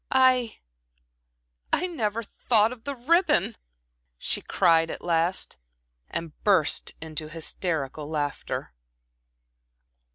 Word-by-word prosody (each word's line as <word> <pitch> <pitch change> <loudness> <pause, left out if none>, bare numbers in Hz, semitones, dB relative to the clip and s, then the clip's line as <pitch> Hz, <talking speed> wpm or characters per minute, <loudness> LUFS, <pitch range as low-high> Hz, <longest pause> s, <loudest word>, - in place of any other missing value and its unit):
"I 255 -3 +4 1.1
I 365 - +2
never 230 - -2
thought 220 +1 +2
of 240 -2 -10
the 280 - -3
ribbon," 335 +9 +2 0.6
she - - -2
cried 165 -3 +3
at - - -6
last, 170 - 0 0.5
and 165 -2 -4
burst 185 -7 +2
into 155 -1 -5
hysterical 155 -2 -3
laughter. 145 - -3
180 Hz, 95 wpm, -26 LUFS, 160-240 Hz, 1.1 s, I